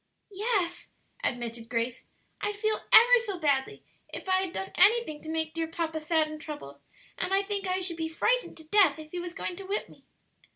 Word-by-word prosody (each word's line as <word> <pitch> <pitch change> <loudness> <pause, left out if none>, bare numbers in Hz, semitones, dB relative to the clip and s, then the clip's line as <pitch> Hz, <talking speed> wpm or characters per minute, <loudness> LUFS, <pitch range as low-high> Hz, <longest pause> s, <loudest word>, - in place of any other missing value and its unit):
"Yes," 390 -4 -1 0.3
admitted 235 -2 -3
Grace; 235 +1 -2 0.4
"I'd 415 0 -2
feel 430 +1 0
ever 485 +2 +9
so 400 -5 -3
badly 290 +4 0 0.3
if - - -7
I'd 375 -1 +1
done 190 - -5
anything 400 -5 +4
to 315 - -8
make 320 -1 -1
dear 330 -1 -2
papa 325 -1 -3
sad 315 0 +1
and 310 0 -8
troubled; 140 - -8 0.4
and - - -2
I 390 +1 +3
think 400 -1 -2
I 370 +1 0
should 350 -2 0
be 320 -1 -2
frightened - - 0
to 320 - -12
death 330 -3 +4
if 310 -1 -11
he 360 - -4
was 350 0 -6
going 360 - -4
to 390 - -8
whip 405 +2 -2
me." - - -18
335 Hz, 200 wpm, -28 LUFS, 310-395 Hz, 0.4 s, ever